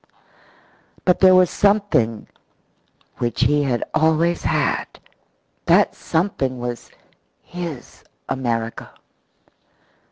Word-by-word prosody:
But 180 - +3
there 185 -1 +6
was 185 -1 +4
something 200 - +1 0.9
which 120 0 -2
he 145 +3 +3
had 130 -4 -1
always 160 +2 +2
had - - 0 0.8
that - - +4
something 160 -7 -2
was 120 -1 -6 0.5
his 170 -8 -8 0.2
America. 115 -3 -3
145 Hz, 85 wpm, -21 LUFS, 120-180 Hz, 0.9 s, there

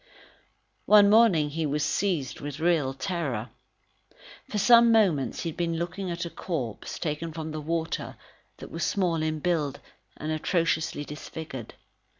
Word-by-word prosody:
One 205 -1 +7
morning, 195 -10 +5
he 160 +1 -1
was 150 +1 0
seized 160 -5 -1
with 145 0 -6
real 160 -5 +2
terror. 135 - -3 1.0
For 210 - -2
some 235 +3 +7
moments, 175 - +2
he 170 - -2
had 160 - -9
been 170 -2 -1
looking 180 +3 -3
at 170 0 -3
a 170 - -6
corpse, 135 - -4
taken 160 0 -3
from 160 0 -5
the 155 0 -4
water, 165 +1 -3 0.4
that - - -10
was 165 - -3
small 175 -5 +1
in 155 0 -1
build 155 -3 -1 0.4
and 155 +1 -4
atrociously 160 -2 0
disfigured. 150 -4 -8
165 Hz, 150 wpm, -27 LUFS, 150-180 Hz, 1.0 s, One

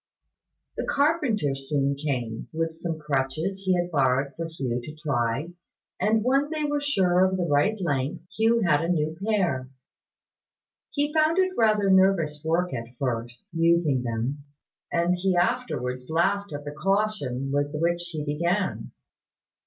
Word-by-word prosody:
The - - -2
carpenter 280 - +1
soon 140 0 -1
came, 125 -6 -3
with 165 0 -2
some 165 0 -4
crutches 150 +6 -2
he 185 -1 +3
had 175 0 -1
borrowed 135 -1 +2
for 165 0 -4
Hugh 130 -7 -3
to 150 +4 -8
try; 140 0 -1 0.5
and 215 +1 +2
when 275 +4 +2
they 310 -1 -2
were 290 0 0
sure 185 -10 +3
of 190 0 +2
the 180 - 0
right 160 +8 +2
length, 145 -3 -1
Hugh 225 +1 +3
had 165 -5 +3
a 165 - -1
new 155 -2 0
pair. 175 -12 0 1.2
He 290 +1 -1
found 315 +2 +3
it 375 0 +3
rather 215 -3 +3
nervous 180 -6 +3
work 170 +2 0
at 120 0 -6
first, 120 -2 -3
using 165 -5 +3
them; 120 +4 -3 0.5
and 170 +1 +2
he 185 +1 0
afterwards 175 - -1
laughed 195 +4 +1
at 145 0 -6
the 145 - -4
caution 150 -7 -1
with 145 0 +1
which 170 +1 +1
he 155 -3 -4
began. 170 +6 -1
165 Hz, 150 wpm, -26 LUFS, 140-195 Hz, 1.2 s, he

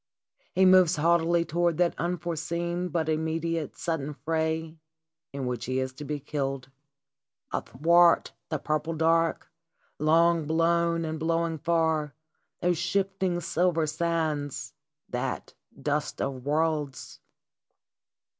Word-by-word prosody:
He 190 - +4
moves 185 -2 +6
haughtily 170 +2 +3
to 165 - -7
ward 170 -2 +2
that 175 -1 +2
unforeseen 170 0 -2
but 160 -1 -1
immediate, 160 0 -1
sudden 150 -4 -3
fray 160 +2 -2 0.5
in 140 -1 -4
which 125 -2 -3
he 130 +1 -1
is 130 0 -3
to 150 - -9
be 150 0 -3
killed. 135 -2 -3 0.8
Athwart 170 +5 +3 0.2
the 155 - -1
purple 155 +2 -2
dark, 165 +1 +1 0.5
long 165 +1 +3
blown 165 +1 +2
and 160 0 -4
blowing 165 0 0
far, 160 -2 +1 0.5
those 175 -2 +1
shifting 190 0 0
silver 170 0 +1
sands, 155 -3 -2 0.4
that - - -3 0.3
dust - - -2
of 130 -2 -3
worlds 150 -2 -1
165 Hz, 115 wpm, -27 LUFS, 150-170 Hz, 0.8 s, moves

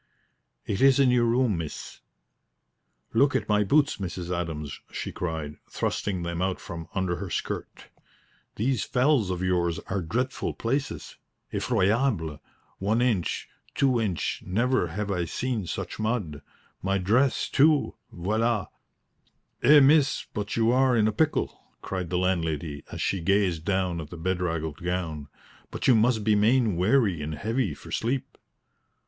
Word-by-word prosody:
"It 100 - -2
is 135 0 +6
in 135 -2 +5
your 120 -1 +3
room, 115 -5 +2
miss." 80 -3 -7 1.1
"Look 135 +5 +3
at - - 0
my 105 0 +3
boots, 145 +8 +3
Mrs. 90 -2 -4
Adams!" 80 -4 -4
she - - -4
cried, 80 -4 -4
thrusting 95 -4 -2
them 85 0 -3
out 95 0 -1
from 85 -2 -7
under 95 -2 0
her 95 +1 -5
skirt. - - -4 0.7
"These 125 +3 0
fells 125 -5 +2
of 90 0 -2
yours 85 -2 +1
are 95 0 0
dreadful 120 +10 -2
places 135 +5 -3 0.4
effroyable 105 - +1 0.4
one 105 +4 +1
inch, 115 -9 0 0.3
two 130 -4 +2
inch; 95 -8 -2
never 120 +1 +1
have 100 +4 -3
I 90 -3 0
seen 115 0 -2
such - - -5
mud! 110 -10 -2 0.4
My 95 +1 +1
dress, 115 +8 +2
too 150 +1 +3 0.2
voila!" 110 +3 0 0.9
"Eh, 150 0 +7
miss, 145 +1 +4
but 105 -1 -3
you 115 0 +3
are 130 -1 +3
in 110 -1 +4
a - - +2
pickle," 155 +8 0 0.2
cried 90 -3 -4
the 90 - 0
landlady, 80 -5 -1
as - - -3
she 95 - 0
gazed 95 -3 +1
down 95 -3 0
at 75 - -9
the 90 - -8
bedraggled 85 -3 -2
gown. 85 -5 -3 0.4
"But - - -3
you 130 - +7
must 110 0 +3
be 110 - +3
main 110 0 +3
weary 95 - +2
and 75 +1 -4
heavy 115 +8 -1
for - - -12
sleep." 125 +3 -2
100 Hz, 150 wpm, -26 LUFS, 85-120 Hz, 1.1 s, Eh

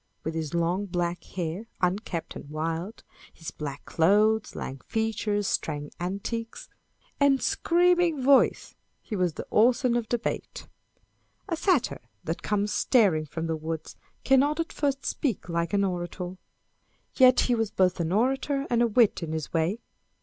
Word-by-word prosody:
With 160 - -3
his 160 -1 -3
long 175 +4 0
black 175 -1 -2
hair, 180 +4 -5
" - - -40
unkempt 180 -2 -2
and 145 - -9
wild 165 +7 -4
" - - -22
â€" - - -28
his 160 - -7
black 145 -2 -7
clothes, 210 +6 +2
lank 135 -1 -6
features, 220 -2 -1
strange 145 -5 -2
antics, 200 +6 -4 0.5
and 280 -2 +4
screaming 350 -1 +2
voice, 275 0 +4 0.3
he 215 - -5
was 180 -4 +1
the - - -6
Orson 245 +2 +3
of 235 -2 -1
debate. 240 -1 -3 0.8
A 335 - -1
Satyr 330 - +1 0.2
that 165 - -3
comes 210 0 0
staring 185 - +3
from 165 +3 -4
the 165 0 -1
woods, 160 0 -5 0.3
Cannot 280 +4 +3
at 330 - -2
first 280 -2 -1
speak 250 -12 -2
like 170 0 -1
an 200 -1 +2
orator. 180 0 -3 0.8
Yet 255 -1 +6
he 245 - +1
was 225 -3 0
both 185 -3 +1
an 165 0 -1
orator 270 +6 +1
and 235 -1 +3
a 240 - +4
wit 225 -3 +3
in 160 -2 -4
his 160 -2 -4
way. 170 +7 0
205 Hz, 160 wpm, -27 LUFS, 170-245 Hz, 0.8 s, Yet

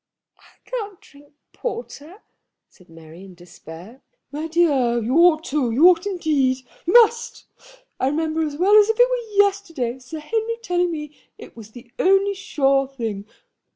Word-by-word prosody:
"I - - -24
can't 420 -6 -6
drink 285 0 -21 0.2
porter," 410 -6 -8 0.4
said 180 -3 -24
Mary, 165 +2 -14
in 190 -2 -14
despair. 175 - -14 0.3
"My 300 +3 -5
dear, 285 -8 +1
you 235 +4 -2
ought 335 -2 +4
to; 285 -6 -1
you 285 +10 +5
ought 360 +2 +1
indeed; 280 -9 -1 0.2
you 355 - 0
must. 470 0 +3 0.5
I 260 - 0
remember 315 +2 -1
as 300 -2 -3
well 390 +5 +3
as 420 0 +5
if 445 - 0
it - - +6
were 450 -5 +1
yesterday 330 -12 -4
Sir 260 +5 -9
Henry 445 +9 -3
telling 355 -3 0
me 300 -3 -7 0.2
it - - -14
was 220 -2 -12
the 240 -1 -14
only 390 +2 +3
sure 275 -8 0
thing. 225 -7 -6
310 Hz, 160 wpm, -21 LUFS, 255-390 Hz, 0.5 s, it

